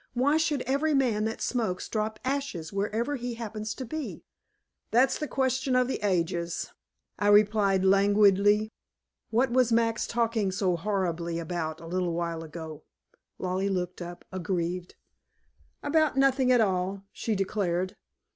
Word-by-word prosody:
Why 280 +5 +3
should 300 -4 0
every 285 +4 +1
man 230 -6 +2
that 225 - -3
smokes 220 -8 -1
drop 215 0 -2
ashes 260 - -3
wherever 220 +8 -1
he 245 -1 -4
happens 215 -2 -5
to 260 - -5
be?" 310 +5 -5 0.7
"That's 250 +4 +3
the 300 - -2
question 260 -1 0
of 255 -1 +3
the 265 - -2
ages," 175 -3 -1 0.5
I 205 - +1
replied 205 -2 +4
languidly. 205 +2 +4 0.6
"What 240 +3 +2
was 250 -1 +3
Max 230 0 +2
talking 230 -4 0
so 185 -2 +1
horribly 170 -3 -1
about 165 -2 -3
a 165 - -11
little 175 0 -1
while 170 -1 -2
ago?" 160 -1 -8 0.6
Lollie 185 +2 -1
looked 180 -2 -2
up 175 0 -8
aggrieved. 180 -1 -3 0.9
"About 310 -1 +2
nothing 270 -1 +4
at 245 -2 +5
all," 190 -1 0
she 220 - -2
declared. 185 -2 -1
205 Hz, 140 wpm, -28 LUFS, 180-245 Hz, 0.9 s, at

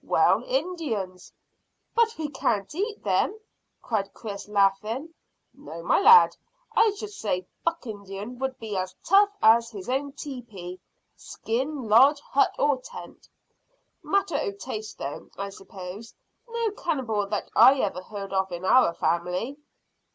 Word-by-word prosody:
"Well, - - +3
Indians." 290 - -3 0.6
"But 460 -1 +2
we 315 -1 -2
can't 205 -5 -1
eat 415 +6 -3
them," 430 - +1 0.4
cried 200 -4 -1
Chris, 205 -3 -7
laughing. 210 +9 +1 0.4
"No, 170 - -10
my - - +3
lad; 450 +3 +8 0.4
I 445 0 +6
should 425 0 -6
say 190 - -2 0.2
buck 335 -3 -1
Indian 205 +2 -7
would 265 -1 -2
be 220 -3 -6
as 185 0 -3
tough 400 +2 +6
as 230 +1 +6
his 200 -4 -9
own 275 +2 -1
teepee 225 -11 -8 0.4
[skin 260 +3 -4
lodge, 270 +7 +6
hut, 280 -1 +1
or 285 -2 +2
tent]. - - -11 0.7
Matter 390 -6 0
o' 200 -9 -2
taste, 215 +1 -7
though, 140 +1 -6
I 200 0 -4
s'pose. 195 +2 -10 0.3
No 460 -2 -1
cannibal 245 - -2
that 205 0 -3
I 270 - +8
ever 185 -3 -2
heard 195 0 -7
of 190 -1 0
in 175 +1 -5
our 190 -5 +5
family." 180 +10 -1
225 Hz, 140 wpm, -26 LUFS, 195-295 Hz, 0.7 s, lad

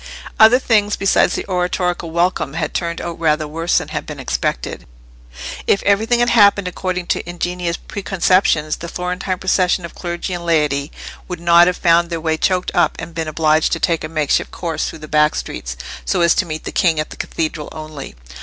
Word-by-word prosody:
Other 220 +3 +8
things 210 -5 +2
besides 195 - +2
the - - -4
oratorical 180 -2 -1
welcome 170 -3 0
had - - -2
turned 170 -1 -2
out 170 -1 -6
rather 155 -2 +1
worse 165 +3 0
than - - -2
had - - -4
been - - -7
expected. 60 -1 -3 0.8
If 200 - +2
everything 220 +4 +2
had 240 - +3
happened 200 -4 +5
according 180 0 -3
to - - -1
ingenious 175 -1 -3
preconceptions, 185 -5 +1
the 170 - -7
Florentine 180 +2 -3
procession 185 -1 +1
of 170 - -9
clergy 175 +1 -4
and 175 -1 -4
laity 150 -3 +1 0.4
would 180 -2 -5
not 170 0 +6
have 180 - 0
found 170 0 +3
their 165 -1 -3
way 160 0 0
choked 180 +3 0
up 175 -3 +2
and 170 - -7
been 160 -1 -3
obliged 155 0 +2
to 165 - -1
take 165 -1 0
a 155 - -4
makeshift 155 -3 0
course 165 -3 -3
through - - -8
the - - -13
back 150 0 +3
streets, - - -5 0.3
so - - 0
as 170 0 +5
to - - 0
meet 155 0 -5
the - - -5
king 165 -5 +2
at 155 - -3
the - - -8
Cathedral 155 -2 -4
only. 155 - -8
170 Hz, 195 wpm, -18 LUFS, 155-180 Hz, 0.8 s, Other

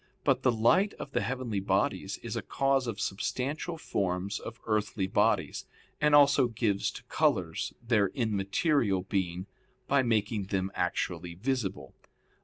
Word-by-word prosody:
But 135 -2 +2
the 130 - +4
light 120 - +3
of - - -8
the - - 0
heavenly 125 -6 -2
bodies 95 - 0
is - - -4
a - - -1
cause 135 -2 +1
of 110 -3 -4
substantial 140 - -2
forms 95 - -2
of 115 - -8
earthly 105 -2 0
bodies, 95 - +1 0.3
and 150 0 +5
also 140 -2 +6
gives 110 -4 0
to - - -9
colors - - 0
their 105 -4 +4
immaterial 105 - +1
being, 90 -2 -2 0.4
by 140 0 +4
making 110 -4 0
them 95 -1 -2
actually 90 -1 -2
visible. 100 - -3
110 Hz, 140 wpm, -29 LUFS, 95-130 Hz, 0.4 s, also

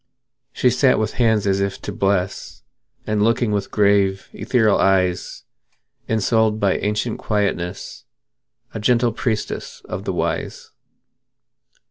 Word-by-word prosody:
She 125 - +2
sat 130 +1 +3
with 110 0 -1
hands 110 -3 +3
as 100 -1 +1
if 100 0 -2
to - - -4
bless, 95 -1 -2 0.4
And 105 -1 0
looked 115 +3 +2
with 105 -3 -1
grave, 100 -2 +2
ethereal 110 -5 +2
eyes; 90 -2 +1 0.7
Ensouled 110 0 +1
by 100 -3 +2
ancient 105 +2 -2
quietness, 100 -4 -3 0.7
A - - -4
gentle 120 +2 +2
priestess 110 -1 -4
of - - -6
the - - -2
Wise. - - -3
105 Hz, 120 wpm, -21 LUFS, 100-110 Hz, 0.7 s, sat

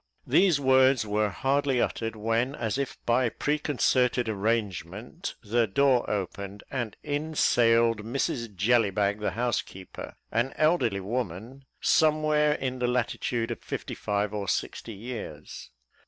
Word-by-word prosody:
These 180 -7 +4
words 130 -2 +4
were 105 0 +1
hardly 135 +3 +1
uttered, 115 -1 -1
when, 115 +5 0
as 115 +1 -2
if 140 - -3
by 120 +1 +2
preconcerted 130 -4 +1
arrangement, 105 - -3
the 115 +2 +1
door 130 +3 +2
opened, 100 0 -4
and 120 -6 -3
in 150 +2 -3
sailed 115 -4 +3
Mrs 115 -2 -2
Jellybag, 105 -1 +2
the 105 - 0
housekeeper, 120 -6 -4 0.2
an 120 +4 0
elderly 135 - +2
woman, 115 +4 -4 0.2
somewhere 155 -1 +3
in 130 -3 -3
the 125 - +1
latitude 120 -1 -1
of - - -5
fifty - - -5
five 105 0 -2
or 100 -2 -3
sixty 115 - -3
years. 100 -9 -8
120 Hz, 125 wpm, -27 LUFS, 105-135 Hz, 0.2 s, These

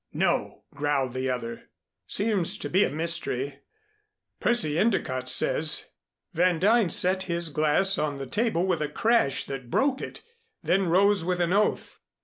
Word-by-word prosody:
"No," - - -1
growled 140 -3 -1
the 130 0 -2
other. 115 -2 -5 0.4
"Seems 205 -2 0
to - - -5
be 190 +3 +4
a - - 0
mystery. 150 -4 -2 0.8
Percy 165 -10 +2
Endicott 130 - 0
says 150 +4 +1 0.2
" - - -57
Van 175 +1 +2
Duyn 210 +1 +3
set 185 +2 +2
his 170 -1 -1
glass 155 +6 +2
on 145 -2 -2
the 135 - -6
table 205 - -1
with 180 -4 -1
a 150 - -2
crash 225 - +1
that 135 -3 -7
broke 270 - 0
it, - - -8 0.4
then 190 +1 +1
rose 195 +2 +3
with 180 +1 -2
an 175 +1 +1
oath. 210 +1 0
170 Hz, 155 wpm, -26 LUFS, 145-195 Hz, 0.8 s, be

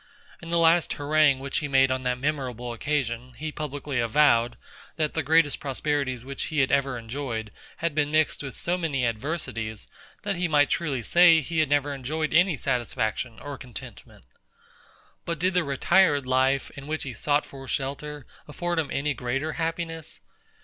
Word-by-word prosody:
In 170 - -9
the 170 - +2
last 165 0 +4
harangue 145 -1 +3
which 135 +3 -2
he 150 - -3
made 135 -1 +4
on 130 0 0
that 125 -1 -1
memorable 125 -4 -3
occasion, 125 -1 -2
he 155 +6 -5
publicly 145 -3 -4
avowed, 120 -1 +3 0.4
that 155 -2 -1
the 160 - 0
greatest 160 -2 +3
prosperities 135 -3 -2
which 135 0 -4
he 155 -2 0
had 135 - +1
ever 135 -2 +1
enjoyed, 115 -2 -5 0.3
had 170 -1 -1
been 145 -1 +1
mixed 155 0 +2
with 135 -2 -6
so 180 +1 -1
many 145 -7 0
adversities, 115 -3 -3 0.4
that 200 -3 -1
he 180 0 0
might 145 -2 +3
truly 140 -8 -1
say 170 +4 +6
he 160 +2 -2
had 155 -3 +2
never 145 0 +1
enjoyed 155 +4 -2
any 175 -1 +4
satisfaction 120 -2 -1
or 145 -2 -7
contentment. 125 -5 -10 1.0
But 170 0 -3
did 185 +3 +1
the 180 -1 +2
retired 145 +1 +3
life, 130 +1 +2
in 135 0 -10
which 155 +1 -2
he 135 - -5
sought 145 +4 +1
for 135 -1 -11
shelter, 140 +1 -4 0.2
afford 175 +3 -2
him 155 - -1
any 145 +1 -1
greater 135 +5 -2
happiness? 165 -1 -4
145 Hz, 170 wpm, -26 LUFS, 130-155 Hz, 1.0 s, say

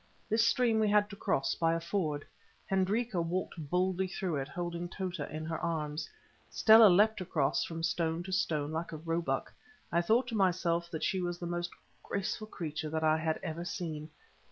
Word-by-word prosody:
This 225 +1 +3
stream 235 -3 +3
we 215 -1 +3
had 205 0 +3
to - - -7
cross 135 -8 0
by 165 0 +1
a - - -1
ford. 165 -4 -2 0.4
Hendrika 195 +1 +1
walked 165 -3 -3
boldly 185 +2 +1
through 180 -4 -2
it, 135 -1 -3
holding 175 +1 -4
Tota 185 -4 -4
in 155 +1 -5
her 160 0 -3
arms. 155 -2 -2 0.4
Stella 220 0 +8
leapt 210 +3 +4
across 150 -6 +1
from 165 -1 -5
stone 165 +1 0
to 190 - -7
stone 155 -6 0
like 160 +2 -3
a 160 - -5
roebuck; 155 -8 -2 0.4
I 170 +2 +3
thought 225 +8 +3
to 230 - -3
myself 175 -3 +1
that 160 -3 -4
she 190 - +1
was 175 -1 -2
the 175 - -6
most 175 0 -2 0.3
graceful 200 +2 -3
creature 155 -6 -4
that 160 +1 -2
I 155 0 +4
had 160 0 -1
ever 170 -1 -4
seen. 160 -3 -5
170 Hz, 185 wpm, -32 LUFS, 160-190 Hz, 0.4 s, Stella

